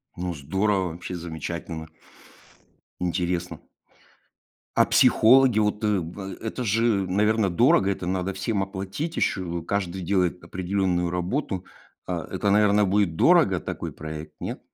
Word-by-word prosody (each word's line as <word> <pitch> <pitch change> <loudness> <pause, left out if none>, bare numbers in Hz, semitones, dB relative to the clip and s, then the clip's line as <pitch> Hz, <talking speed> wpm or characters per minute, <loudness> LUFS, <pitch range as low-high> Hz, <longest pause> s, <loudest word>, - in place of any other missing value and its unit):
Ну 90 0 -3
здорово, 95 +5 0
вообще 90 +2 -7
замечательно. 80 -1 -6 1.1
Интересно. 85 -2 -2 1.2
А - - +6
психологи? 125 0 +5
Вот, 105 0 +1
э, 105 - +2
в 95 +3 -6
это 115 +3 -4
же, 110 -3 +1
наверное, 105 +1 +2
дорого. 115 - +4
Это 95 -2 -3
надо 95 +1 -1
всем 95 +2 -1
оплатить 95 - -4
еще. 85 -3 -1
Каждый 95 0 -2
делает 90 -1 0
определенную 90 -1 -1
работу. 95 - -2 0.4
А, - - -4
это, 100 - 0
наверное, 105 0 +4
будет 95 -4 +1
дорого - - +4
такой - - -5
проект, 75 0 -8
нет? - - -5
95 Hz, 125 wpm, -25 LUFS, 85-105 Hz, 1.2 s, А